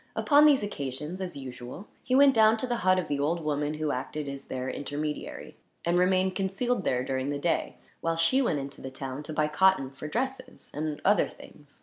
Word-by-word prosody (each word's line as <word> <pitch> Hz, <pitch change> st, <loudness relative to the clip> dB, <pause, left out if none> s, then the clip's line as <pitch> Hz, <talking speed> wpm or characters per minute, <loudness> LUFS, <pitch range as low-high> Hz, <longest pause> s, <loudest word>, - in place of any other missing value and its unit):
Upon 295 Hz, 0 st, +6 dB
these 275 Hz, -7 st, +4 dB
occasions, 150 Hz, -1 st, -5 dB
as 180 Hz, -5 st, -4 dB
usual, 130 Hz, -, -8 dB, 0.2 s
he 255 Hz, -, +1 dB
went 275 Hz, 0 st, +7 dB
down 220 Hz, -1 st, +5 dB
to 220 Hz, -, -2 dB
the 240 Hz, -1 st, -1 dB
hut 185 Hz, -4 st, +3 dB
of 180 Hz, -3 st, -1 dB
the 145 Hz, -1 st, -1 dB
old 165 Hz, +4 st, 0 dB
woman 150 Hz, 0 st, -1 dB
who 155 Hz, -1 st, -1 dB
acted 145 Hz, +3 st, -4 dB
as 140 Hz, 0 st, -6 dB
their 130 Hz, 0 st, -4 dB
intermediary; 150 Hz, +2 st, -4 dB, 0.3 s
and 170 Hz, +1 st, +2 dB
remained 185 Hz, +1 st, +3 dB
concealed 195 Hz, +4 st, -1 dB
there, 125 Hz, -5 st, +1 dB
during 130 Hz, +1 st, -2 dB
the 145 Hz, -, -1 dB
day, 165 Hz, +4 st, -1 dB, 0.2 s
while 165 Hz, 0 st, 0 dB
she 165 Hz, +12 st, +3 dB
went 230 Hz, -, +1 dB
into 140 Hz, 0 st, -6 dB
the 135 Hz, -, -6 dB
town, 130 Hz, +1 st, -6 dB
to 150 Hz, -, -8 dB
buy 155 Hz, 0 st, +1 dB
cotton 155 Hz, -3 st, +3 dB
for 140 Hz, +2 st, -8 dB
dresses, 260 Hz, -, -4 dB
and 150 Hz, 0 st, -3 dB
other 205 Hz, -1 st, +4 dB
things. 145 Hz, -1 st, -14 dB
155 Hz, 210 wpm, -28 LUFS, 140-195 Hz, 0.3 s, went